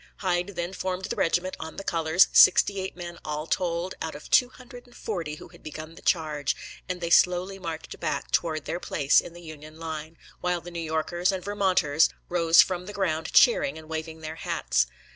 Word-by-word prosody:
Hyde 180 0 -1
then 175 +2 -3
formed 185 0 -3
the - - -3
regiment 175 +2 0
on 160 - -7
the 195 - -6
colors, 165 0 +3
sixty 200 -1 +6
eight 190 0 -5
men 175 -1 -7
all 150 0 -4
told, 175 +1 -1
out 160 - -4
of 145 - -11
two 250 - +5
hundred 250 -1 -13
and 245 - -19
forty 170 -8 -4
who - - -12
had - - -17
begun 155 +1 -8
the - - -14
charge, 150 -4 0 0.3
and 180 -1 -3
they 170 0 -3
slowly 180 +3 +3
marched 165 -3 -6
back - - -3
toward 155 -3 0
their 175 - -3
place 145 -5 +3
in 170 - -10
the 175 0 -12
Union 155 -1 -11
line, 160 0 -6 0.2
while 180 -1 0
the 175 +1 -10
New 170 - -5
Yorkers 165 +3 0
and 190 -2 -4
Vermonters 185 -7 +2 0.2
rose 170 -1 +6
from 180 -1 -5
the 205 - -7
ground 165 -5 -1
cheering 195 - +4
and 160 -1 -11
waving 160 0 -5
their 160 +1 -6
hats. 60 - 0
170 Hz, 200 wpm, -26 LUFS, 160-185 Hz, 0.3 s, sixty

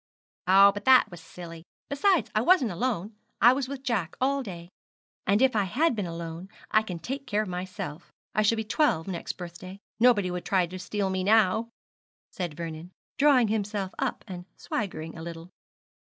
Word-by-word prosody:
'Oh, 195 +2 +7
but 205 +1 -8
that 260 -5 +6
was 175 -1 -10
silly. 165 -1 -10 0.2
Besides, 350 +5 +2
I 215 - +2
wasn't 270 - +4
alone 210 +1 -2 0.3
I 240 +4 +7
was 265 -1 -2
with 275 -1 -7
Jack 200 -11 -1
all 275 +2 +1
day. 175 -7 -8 0.6
And 205 +6 +4
if 260 -3 +3
I 205 -2 +2
had 280 - +1
been 205 -4 -2
alone, 165 +2 -7 0.2
I 215 - +5
can 185 -5 -6
take 270 - -6
care 210 -1 +1
of - - -7
myself 180 -3 -6 0.2
I 215 - +2
shall 215 +2 +3
be 220 - -2
twelve 215 - +1
next 180 -3 -4
birthday. 180 +2 -9 0.2
Nobody 215 -6 +4
would 180 0 -4
try 185 -2 +2
to 185 +2 -8
steal 190 +2 -2
me 190 0 -1
now,' 220 +2 +3 0.6
said 175 -8 -4
Vernon, 165 0 -6 0.3
drawing 270 -6 +5
himself 205 -3 -2
up - - -2
and 180 -2 -7
swaggering 165 -6 -4
a 160 - -8
little. 170 +1 -8
195 Hz, 180 wpm, -27 LUFS, 175-230 Hz, 0.6 s, Oh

